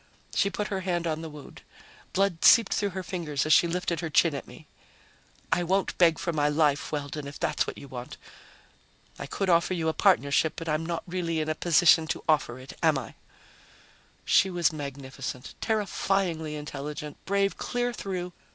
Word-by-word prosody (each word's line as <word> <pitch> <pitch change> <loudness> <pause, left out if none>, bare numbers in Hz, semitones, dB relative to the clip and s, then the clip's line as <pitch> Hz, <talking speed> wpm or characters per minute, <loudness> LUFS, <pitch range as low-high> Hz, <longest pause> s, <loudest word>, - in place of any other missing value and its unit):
She 200 - +2
put 210 +1 -3
her 195 - -2
hand 175 -2 -1
on 160 -1 -2
the 165 - -6
wound. 150 -2 -12 0.5
Blood 190 -3 0
seeped 230 -4 +7
through 205 - 0
her 190 0 -5
fingers 165 -7 -2
as 155 - +4
she 170 - +6
lifted 175 0 -2
her 165 - -3
chin 160 +1 +4
at 140 - -6
me. - - -13 0.9
"I 170 - +1
won't 190 +3 0
beg 165 -3 +5
for 170 - -2
my 150 -1 +2
life, 150 -1 +1
Weldon, 145 0 -4
if 140 - -9
that's - - 0
what - - -6
you 140 - -10
want. 125 -1 -8 1.0
I - - -5
could 195 - -2
offer 175 +1 +3
you 160 -2 0
a - - -1
partnership, 160 -5 +3
but 165 - -7
I'm 155 +1 0
not 170 -1 -3
really 175 -2 -2
in 155 0 -2
a - - +2
position 165 0 +4
to - - -3
offer 150 -6 +2
it, 130 +1 -10
am 160 -4 +4
I?" 130 - -6 1.1
She 190 - +4
was 175 -3 +1
magnificent, 135 -3 -6
terrifyingly 195 -7 -1
intelligent, 150 0 -7
brave 200 0 +1
clear 245 0 -2
through 180 -4 -4
165 Hz, 185 wpm, -27 LUFS, 150-185 Hz, 1.1 s, seeped